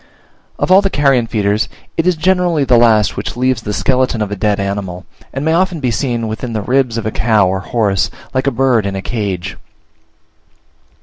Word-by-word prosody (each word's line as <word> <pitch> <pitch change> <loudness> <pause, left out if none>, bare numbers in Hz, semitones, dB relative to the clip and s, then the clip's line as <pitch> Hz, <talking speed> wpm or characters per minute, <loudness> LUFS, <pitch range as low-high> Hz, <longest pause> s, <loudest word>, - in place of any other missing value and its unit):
Of - - -1
all 190 +2 +7
the 195 - 0
carrion 135 -7 +2
feeders 105 -1 0 0.3
it 165 +1 0
is 180 - +3
generally 175 -2 +1
the 130 -2 +3
last 110 -3 +4
which - - -5
leaves 130 -2 +1
the 105 - -4
skeleton 125 +2 0
of 105 - -5
a - - -2
dead 105 0 0
animal, 100 -2 -4 0.3
and 135 +2 -4
may 160 - +2
often 180 -1 +1
be 130 -4 -1
seen 120 -2 -1
within 110 +2 -5
the 110 - -2
ribs 125 -1 +1
of 115 - -3
a 110 - -1
cow 110 -4 +2
or 95 +1 -1
horse, 100 -2 0 0.2
like 130 +1 0
a - - +3
bird 120 -4 +1
in 100 - -3
a 95 - -4
cage. 100 -7 -3
115 Hz, 200 wpm, -15 LUFS, 105-135 Hz, 0.3 s, all